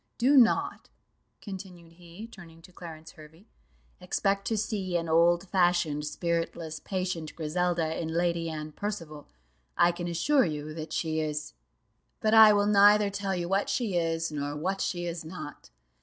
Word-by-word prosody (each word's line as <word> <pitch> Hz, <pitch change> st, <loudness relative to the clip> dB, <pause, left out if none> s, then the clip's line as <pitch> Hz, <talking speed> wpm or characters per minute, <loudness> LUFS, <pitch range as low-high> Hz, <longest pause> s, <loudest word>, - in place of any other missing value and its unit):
Do 265 Hz, +5 st, +3 dB
not," 240 Hz, -4 st, +3 dB, 0.5 s
continued 185 Hz, -4 st, -9 dB
he, 175 Hz, +4 st, -12 dB
turning 165 Hz, -7 st, -14 dB
to 185 Hz, -, -15 dB
Clarence 160 Hz, -3 st, -10 dB
Hervey, 160 Hz, +5 st, -16 dB, 0.5 s
"expect 195 Hz, +2 st, -1 dB
to 225 Hz, -, 0 dB
see 195 Hz, -4 st, -1 dB
an 165 Hz, -1 st, -3 dB
old 170 Hz, +3 st, +3 dB
fashioned, 175 Hz, -5 st, +1 dB
spiritless, 165 Hz, 0 st, -3 dB
patient 185 Hz, -5 st, -4 dB
Griselda, 170 Hz, 0 st, -1 dB
in 165 Hz, -, -3 dB
Lady 170 Hz, 0 st, -1 dB
Anne 155 Hz, -1 st, -6 dB
Percival: 165 Hz, -6 st, -6 dB, 0.5 s
I 175 Hz, -, +5 dB
can 175 Hz, 0 st, -5 dB
assure 260 Hz, -, +2 dB
you 155 Hz, -2 st, -4 dB
that 155 Hz, 0 st, -7 dB
she 160 Hz, -1 st, -1 dB
is 150 Hz, -, -3 dB, 0.7 s
but 215 Hz, 0 st, +1 dB
I 220 Hz, -1 st, +9 dB
will 205 Hz, -1 st, +3 dB
neither 205 Hz, 0 st, +5 dB
tell 200 Hz, -1 st, -2 dB
you 175 Hz, -1 st, -3 dB
what 195 Hz, +2 st, 0 dB
she 225 Hz, -7 st, -1 dB
is, 165 Hz, -1 st, -1 dB
nor 145 Hz, -1 st, -3 dB
what 190 Hz, +6 st, -2 dB
she 175 Hz, -1 st, -2 dB
is 170 Hz, -1 st, -4 dB
not. 160 Hz, -, -9 dB
175 Hz, 155 wpm, -28 LUFS, 160-195 Hz, 0.7 s, I